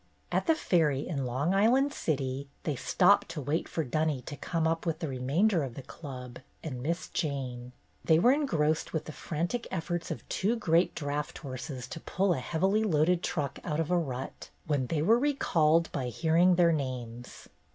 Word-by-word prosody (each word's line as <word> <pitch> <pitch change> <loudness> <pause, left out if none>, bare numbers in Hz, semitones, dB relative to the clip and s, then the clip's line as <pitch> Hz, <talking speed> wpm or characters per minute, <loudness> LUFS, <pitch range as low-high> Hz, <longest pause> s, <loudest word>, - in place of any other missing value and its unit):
At - - 0
the 325 - +5
ferry 150 - +1
in 140 -6 -2
Long 140 +9 0
Island 250 +8 +3
City 135 -2 -2 0.2
they 150 - -1
stopped 185 - +3
to 155 - -5
wait 145 +5 -1
for 160 - -1
Dunny 150 -1 -1
to 145 - -7
come 165 +2 -1
up 165 0 0
with 165 -3 -1
the 160 - -4
remainder 150 +9 +1
of 130 -4 -4
the 135 - -7
Club 125 -4 -9 0.2
and 130 -6 -5
Miss 165 +6 -2
Jane. 125 -5 -3 0.3
They 160 - +5
were 240 +10 +5
engrossed 160 - +1
with 160 - -2
the - - -6
frantic 170 - -3
efforts 175 -1 -3
of - - -6
two 210 +5 0
great 175 -5 +2
draught 145 -1 -3
horses 130 -2 -6
to - - -6
pull 190 +3 +1
a 155 - -2
heavily 190 - +1
loaded 170 -2 +2
truck 150 -8 -2
out 150 -2 -2
of 165 +1 -1
a - - +4
rut, 130 -5 -5 0.2
when 140 -4 0
they 155 +1 0
were 225 +7 +5
re 290 +2 +1
called 165 - +2
by 130 -3 -2
hearing 165 +7 +3
their 170 -1 +5
names. 125 -4 -5
160 Hz, 190 wpm, -30 LUFS, 135-175 Hz, 0.3 s, the